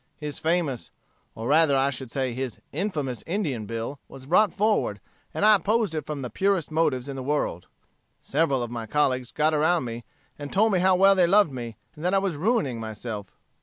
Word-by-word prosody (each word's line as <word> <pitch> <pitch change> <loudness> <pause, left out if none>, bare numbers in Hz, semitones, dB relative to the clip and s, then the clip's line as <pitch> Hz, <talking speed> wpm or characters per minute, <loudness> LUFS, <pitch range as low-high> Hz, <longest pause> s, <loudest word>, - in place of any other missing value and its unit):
His 150 -1 -5
famous, 160 - -1 0.5
or 115 +1 -5
rather 145 -1 +4
I 135 +1 +2
should 130 -1 -7
say 130 -1 -2
his 130 -1 -4
infamous 150 - -3
Indian 155 - -2
bill 115 +5 -4
was 130 -1 -12
brought 195 +8 +4
forward, 210 +1 +1 0.3
and - - 0
I 215 - +8
opposed 210 0 +1
it 155 - -4
from 145 -3 -4
the 125 - -5
purest 195 -5 0
motives 150 -5 +1
in 140 - -5
the 135 - -5
world. 130 - -2 0.5
Several 140 -4 0
of 120 - -6
my 115 -2 -5
colleagues 130 0 0
got 155 +1 +1
around 155 0 +2
me, 115 0 -6 0.4
and 145 -1 -6
told 215 +3 +3
me 185 - +3
how 185 +1 +4
well 195 +2 +6
they 185 -3 +4
loved 200 -3 +4
me, 120 -4 -6 0.2
and 150 - -10
that 180 +2 +2
I - - +5
was 195 -4 0
ruining 160 - 0
myself. 110 -2 -6
150 Hz, 205 wpm, -25 LUFS, 125-180 Hz, 0.5 s, I